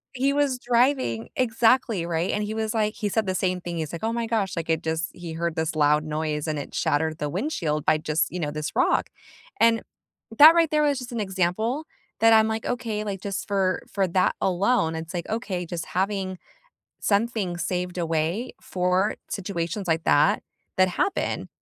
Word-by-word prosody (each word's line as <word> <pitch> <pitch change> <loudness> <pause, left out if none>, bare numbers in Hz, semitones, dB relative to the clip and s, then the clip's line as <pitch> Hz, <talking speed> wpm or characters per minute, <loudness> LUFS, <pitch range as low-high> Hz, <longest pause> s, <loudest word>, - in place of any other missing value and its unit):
He 270 +2 +1
was 285 -3 +1
driving 240 - +1
exactly, 230 -5 +2
right? 170 +1 -1
And, 210 - -1
he 210 +1 -3
was, 220 -1 -2
like 215 -1 0
he 210 -4 -2
said 220 +1 0
the 185 - 0
same 185 -1 0
thing, 175 -1 -5
he's 160 -1 -4
like, 170 - -6
"Oh 225 +1 0
my 235 0 -1
gosh." 220 -4 -1
Like, 165 -1 -4
it 160 -1 +1
just 160 +1 -2
he 170 -2 -7
heard 170 0 -2
this 160 0 -1
loud 150 0 +3
noise 155 0 -2
and 155 -1 -1
it 145 - -6
shattered 155 +1 0
the 150 - -2
windshield 165 - -2
by 155 - +4
just, 155 +1 0
you 180 - -4
know, 150 -3 -2
this 150 0 -4
rock. - - +2 0.5
And, 230 -1 +4 0.6
that 310 +4 +10
right 335 -2 +3
there 300 0 +2
was 285 -2 +2
just 250 -1 -8
an 235 - -3
example 205 - -1 0.3
that 225 0 +6
I'm 220 0 +6
like, 220 0 -2
okay, 225 -3 -2
like, 200 -2 -4
just 200 -1 -4
for 190 -2 +1
for 195 -2 +1
that 185 +2 +2
alone, 190 -2 +2
it's 160 0 -6
like, 175 -2 -4
okay, 205 -6 -3
just 170 -1 -5
having 190 0 -1 0.6
something 205 -3 0
saved 180 +1 -2
away 165 +7 -1
for 185 +3 0
situations 180 0 -3
like 160 0 +1
that, 150 0 +3 0.3
that 185 0 +4
happen, 375 - -1
185 Hz, 195 wpm, -25 LUFS, 165-225 Hz, 0.6 s, that